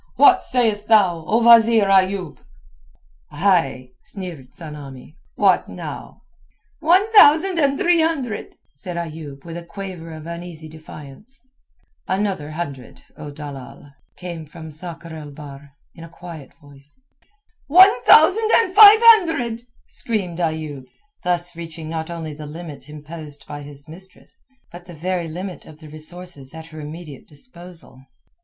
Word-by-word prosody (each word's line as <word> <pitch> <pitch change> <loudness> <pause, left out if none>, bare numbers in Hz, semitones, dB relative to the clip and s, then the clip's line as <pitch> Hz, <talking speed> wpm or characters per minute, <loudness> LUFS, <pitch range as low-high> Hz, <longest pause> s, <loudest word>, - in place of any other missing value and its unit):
What 380 -3 +6
sayest 220 -4 0
thou, 190 -7 +3
O 225 +2 +2
wazeer 230 -2 +6
Ayoub?" 190 -4 +1 0.9
"Ay!" 145 -6 0
sneered 170 -10 -8
Tsamanni, 150 -3 -11 0.2
"what - - +2
now?" - - -9 0.6
"One 360 +6 +3
thousand 350 -2 +6
and 280 -2 +2
three 345 0 +3
hundred," 280 -9 -2 0.2
said 170 +5 -8
Ayoub 155 -4 -7
with 165 0 -7
a 175 - -8
quaver 180 -2 -8
of 155 -1 -10
uneasy 170 -1 -7
defiance. 155 - -13 0.6
"Another 190 -6 -2
hundred, 145 -6 -7
O 150 - -9
dalal," 140 -1 -10 0.2
came 170 -3 -8
from 160 0 -11
Sakr 165 +1 -8
el 150 -2 -9
Bahr 140 -1 -12 0.2
in 165 - -12
a 165 - -11
quiet 165 -5 -11
voice. 145 - -18 0.7
"One 365 -3 +6
thousand 380 - +5
and 375 -5 +2
five 420 +1 +10
hundred," 285 - -2 0.3
screamed 190 -7 -3
Ayoub, 155 -5 -3 0.4
thus 175 -1 -1
reaching 165 -1 -8
not 160 0 -4
only 165 -3 -6
the 150 0 -9
limit 155 -2 -10
imposed 150 0 -10
by 145 0 -8
his 145 0 -12
mistress, 185 +4 -14 0.2
but 175 +1 -12
the 175 - -11
very 175 +1 -3
limit 180 +3 -7
of 155 - -14
the 155 -1 -13
resources 155 -2 -8
at 160 0 -9
her 155 -1 -12
immediate 150 -2 -10
disposal. 170 - -11
170 Hz, 135 wpm, -21 LUFS, 150-200 Hz, 0.9 s, five